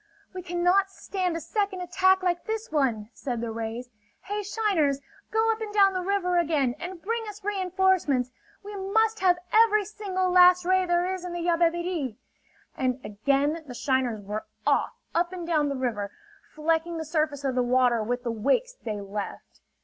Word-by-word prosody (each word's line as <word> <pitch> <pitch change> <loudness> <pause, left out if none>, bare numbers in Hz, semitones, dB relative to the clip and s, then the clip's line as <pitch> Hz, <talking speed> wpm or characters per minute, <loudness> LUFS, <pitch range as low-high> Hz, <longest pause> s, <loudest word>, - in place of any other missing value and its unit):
"We 370 - -5
cannot 355 +2 +2
stand 370 -3 -3
a - - -3
second 395 +2 -2
attack 375 +1 +3
like 350 -1 0
this 440 -3 -4
one," 240 -8 0
said 245 -4 -4
the 230 -1 -3
rays. 230 +2 -5 0.3
"Hey, 415 +2 -3
shiners! 390 -10 +1 0.3
Go 445 +1 +2
up 445 0 -4
and 430 -1 -4
down 395 -2 +5
the 370 - -1
river 360 -2 +1
again, 295 -7 +1
and 360 0 -6
bring 460 +6 -2
us 420 0 -11
reenforcements! 375 -9 +1 0.3
We 410 +1 -8
must 440 +3 +1
have 360 -2 +4 0.2
every 430 -2 +5
single 375 -3 -2
last 360 0 +6
ray 370 0 +3
there 350 0 +2
is 370 -1 -6
in 360 -1 -5
the 345 - -3
Yabebirì!" 340 - +1 0.6
And 255 -1 -1
again 280 +9 0
the 250 - -8
shiners 255 -5 0
were 210 +2 -4 0.2
off - - +2 0.2
up 345 +2 +1
and 355 -2 -5
down 310 -4 +1
the 280 - -2
river, 230 -6 -2 0.4
flecking 325 +2 0
the 320 - -4
surface 305 -3 -1
of 270 -2 0
the 250 - +1
water 245 -1 +3
with 245 +3 -2
the 235 - -1
wakes 275 - +1
they 220 - -5
left. 200 +1 -7
345 Hz, 180 wpm, -26 LUFS, 260-380 Hz, 0.6 s, last